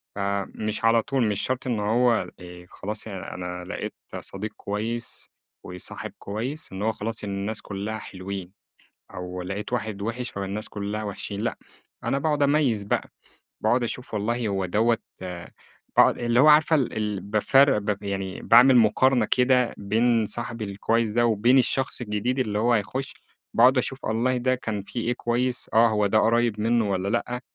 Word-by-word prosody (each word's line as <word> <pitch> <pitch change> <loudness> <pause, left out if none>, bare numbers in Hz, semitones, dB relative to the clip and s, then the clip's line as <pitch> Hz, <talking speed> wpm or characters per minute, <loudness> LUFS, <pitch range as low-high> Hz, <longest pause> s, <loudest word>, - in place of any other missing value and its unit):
فمش 100 +2 -2
على 115 0 +5
طول، 130 -2 0
مش 105 -1 -1
شرْط 130 0 -2
إن 120 -4 0
هو، 115 +3 +2
آآ 90 -1 -11
خلاص 105 +2 -4
أنا 90 -3 -6
لقيت - - -5 0.3
صديق 105 +2 -6
كويس 115 +3 -3 0.3
وصاحب 90 0 -6
كويس 125 +10 -4
إن 95 +1 -6
هو 110 +2 +2
خلاص، 110 0 -4
إن 105 - -4
الناس 100 +2 -2
كلّها 100 +2 -4
حلوين 95 -2 -7 0.6
أو 90 0 -5
لقيت 100 +6 -5
واحد 110 -4 -3
وِحش 120 +4 -3
فالناس 100 +2 -4
كلها 105 +1 -4
وِحشين، 100 0 -4
لأ، 115 - -2 0.5
أنا 140 - 0
باقعُد 150 0 +1
أميّز 140 -7 +2
بقى، 100 - -1 0.5
باقعُد 120 +3 +3
أشوف 125 +1 -5
والله 115 +3 -1
هو 95 -2 -1
دَوّة 115 +6 +2 1.0
باقعُد - - +6
اللي 120 0 +2
هو 145 - +7
عارفة 155 +1 +6
ال 135 -6 0
ال 105 -3 -2
بافرّق 110 +7 +4
ب 105 - -4
ب 105 - -5
يعني 95 -1 -4
باعمل 125 +2 +7
مقارنة 120 +3 +4
كده 125 -1 +3
بين 115 +3 +2
صاحبي 115 +1 -4
الكويس 110 +3 0
ده 120 +2 +2
وبين 120 +3 +4
الشخص 130 0 +2
الجديد 120 +3 -1
اللي 105 -5 0
هو 120 +2 +3
هيخش، 120 +5 -2 0.4
باقعُد 125 +3 +6
أشوف، 130 +1 -2
والله 120 +4 +1
ده 130 +1 +1
كان 110 -5 -4
في 120 - -6
إيه 120 +1 0
كويس، 120 +1 -1
آه، 115 +1 +6
هو 105 -2 +2
ده 110 +2 +3
قريّب 115 -1 +2
مِنُّه 115 -1 +2
والّا 95 0 -1
لأ، 120 +3 -1
110 Hz, 170 wpm, -25 LUFS, 100-125 Hz, 1.0 s, هو